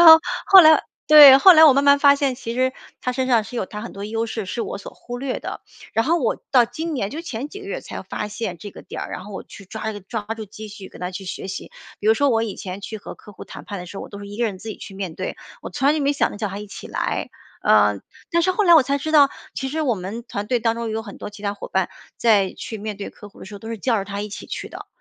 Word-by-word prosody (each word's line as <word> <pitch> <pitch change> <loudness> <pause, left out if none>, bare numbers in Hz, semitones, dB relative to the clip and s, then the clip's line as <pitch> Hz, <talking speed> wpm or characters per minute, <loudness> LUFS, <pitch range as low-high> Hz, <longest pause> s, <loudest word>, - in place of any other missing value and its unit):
然 - - +4
后 - - -10 0.3
后 385 -1 +10
来 315 -2 +7 0.3
对， 290 -3 +11
后 370 +7 +9
来 320 -1 +8
我 290 - +8
慢 275 - +2
慢 280 0 +6
发 280 -1 +6
现， 275 -3 0
其 230 -3 -6
实 255 +1 +1 0.3
她 250 - -1
身 255 +1 -1
上 235 -4 +3
是 245 +3 -8
有 195 - -1
她 210 +2 -8
很 230 - -7
多 200 +1 -7
优 225 +2 -2
势 220 -2 -4
是 230 +5 -3
我 - - -4
所 200 - -10
忽 245 0 -8
略 260 0 -3
的。 - - -6 0.3
然 225 - +1
后 335 +4 +3
我 250 -9 0
到 250 -3 +6
今 310 +8 -4
年， 205 -8 -2
就 315 +4 -6
前 280 -3 -5
几 400 - -9
个 400 - -10
月 400 - -5
才 - - -7
发 210 - -5
现 205 -4 -4
这 205 +3 -9
个 - - -12
点 - - -7
儿， - - -6
然 - - -6
后 205 - -10
我 - - -6
去 200 - -13
抓 220 +3 -5
一 - - -4
个 205 - -7
抓 205 +3 -5 0.2
住 220 - -6
机会 210 -1 -10
跟 - - -14
她 180 +1 -3
去 190 +1 -7
学 190 +1 -6
习。 190 - -6 0.3
比 210 - -2
如 220 - +7
说 285 +5 +2
我 225 -2 +2
以 215 -3 -4
前 185 0 -7
去 205 +2 -7
和 - - -9
客 210 - -15
户 - - -10
谈 - - -11
判 200 - -6
的 180 - -7
时 195 +3 -9
候， - - -5
我 - - -11
都 200 - -9
是 200 - -9
一 205 - -9
个 240 - +1
人 205 -4 -3
自 220 +4 -8
己 210 - -6
去 - - -10
面 190 -4 -5
对， 185 - -4 0.3
我 - - -7
从 255 +9 -3
来 290 - +5
就 310 - -1
没 285 0 +1
想 285 - +1
着 - - -8
叫 210 - -2
她 195 +1 -6
一 210 - -7
起 205 - -9
来。 - - -2 0.3
呃， 105 -1 +4 0.3
但 340 - +3
是 370 - +2
后 420 - +1
来 345 -3 +6
我 315 - +8
才 280 +2 0
知 310 +3 -4
道， 285 -3 +6 0.2
其 265 - -3
实 310 +4 -2
我 260 -7 +1
们 200 +5 -6
团 205 -3 -5
队 245 -1 0
当 230 0 +1
中 230 -1 -4
有 220 0 -3
很 200 -3 -10
多 - - -7
其 205 0 -13
他 200 -1 -1
伙 200 - -8
伴 - - 0 0.3
在 205 -5 +3
去 220 - -7
面 210 0 -5
对 200 - -6
客 205 - -13
户 200 - -18
的 - - -10
时 200 - -11
候 200 - -8
都 225 - -10
是 230 - -4
叫 230 +1 +1
着 195 - -3
她 200 0 -5
一 210 - -5
起 205 - -8
去 - - -6
的。 - - -10
225 Hz, 345 characters per minute, -22 LUFS, 200-275 Hz, 0.3 s, 对